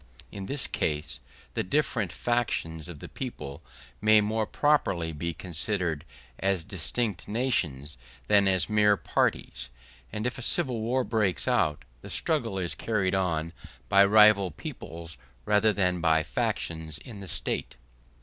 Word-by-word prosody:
In 100 -1 -6
this 140 -2 0
case 75 0 -2 0.3
the - - 0
different 115 - 0
fractions 85 -11 -1
of 80 -5 -9
the - - -7
people 70 - -6 0.4
may 110 0 +6
more 110 +1 0
properly 100 - +1
be 85 +3 -3
considered 85 -1 -2 0.3
as 95 -3 +1
distinct 95 +4 -2
nations 85 - -1 0.3
than 100 -1 +5
as 95 -1 +5
mere 105 -1 +4
parties; - - -1 0.4
and 105 +1 -4
if 125 +2 -2
a - - -6
civil 125 -3 0
war 125 +4 +1
breaks 105 -7 0
out, 75 -1 +1 0.2
the - - -10
struggle 120 -11 0
is 90 -2 -1
carried 100 -4 0
on 85 -4 0 0.4
by 100 -1 +7
rival 105 -1 +6
peoples 80 0 -8 0.3
rather 105 +1 +4
than 90 -4 0
by 80 -2 +3
factions 80 0 -2
in 105 +5 -10
the 100 - -8
State. 80 -2 -2
100 Hz, 140 wpm, -28 LUFS, 80-110 Hz, 0.4 s, by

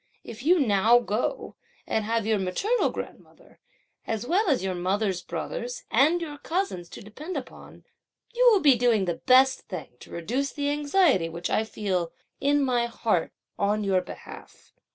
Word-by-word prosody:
If 230 0 -9
you 345 +6 +4
now 225 -2 +4
go 245 - -2 0.3
and 220 - -1
have 225 -1 0
your 220 -2 +1
maternal 395 - 0
grandmother, - - -10 0.5
as 225 +1 -2
well 380 - +1
as 265 -8 +1
your 190 -1 -1
mother's 185 +1 -1
brothers 230 +9 -5
and 300 +9 +4
your 300 -4 -6
cousins 320 - -3
to - - -10
depend 295 - -7
upon, - - -10 0.5
you - - +5
will 410 -4 +4
be 285 -4 +6
doing 230 -4 +2
the 175 -2 -2
best 260 +1 +5
thing 180 -6 -6
to - - -14
reduce 250 +12 -3
the 285 0 -1
anxiety 295 - +2
which 170 +1 -5
I 220 - +2
feel 190 -6 -2 0.3
in 285 0 +2
my 240 -2 +1
heart 225 -6 -1 0.3
on 210 +1 +1
your 190 -2 +2
behalf. - - -12
235 Hz, 165 wpm, -26 LUFS, 195-290 Hz, 0.5 s, be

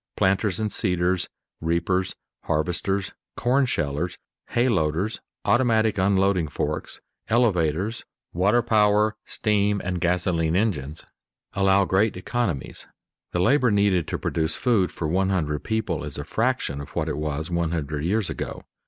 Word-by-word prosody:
Planters 95 +1 +2
and 110 -1 -1
seeders, 90 -2 0 0.3
reapers, 85 +3 0 0.3
harvesters, 90 +5 -1 0.3
corn 130 +2 +2
shellers, 75 - -1 0.3
hay 120 +2 +1
loaders, 90 0 0 0.3
automatic 110 -4 +3
unloading 95 -3 +2
forks, - - -3 0.3
elevators, 105 -2 +1 0.3
water 100 +7 +3
power, 105 0 +3
steam, 105 -1 +1
and 90 -1 -2
gasoline 85 -2 +1
engines 80 -8 -1 0.5
allow 95 0 +3
great 95 +2 +2
economies. 95 - -2 0.4
The 90 - 0
labor 130 +5 +4
needed 100 -5 +2
to - - -2
produce 80 -1 -1
food 110 -8 +2
for 80 - -3
one 95 +4 +1
hundred 75 -6 -1
people 110 -1 -1
is - - -5
a - - -4
fraction 115 - -1
of 70 - -9
what 80 - 0
it 75 -2 -2
was 75 +2 -3
one 85 -1 0
hundred 75 -3 -3
years 100 +3 +1
ago. - - -5
95 Hz, 135 wpm, -24 LUFS, 80-105 Hz, 0.5 s, labor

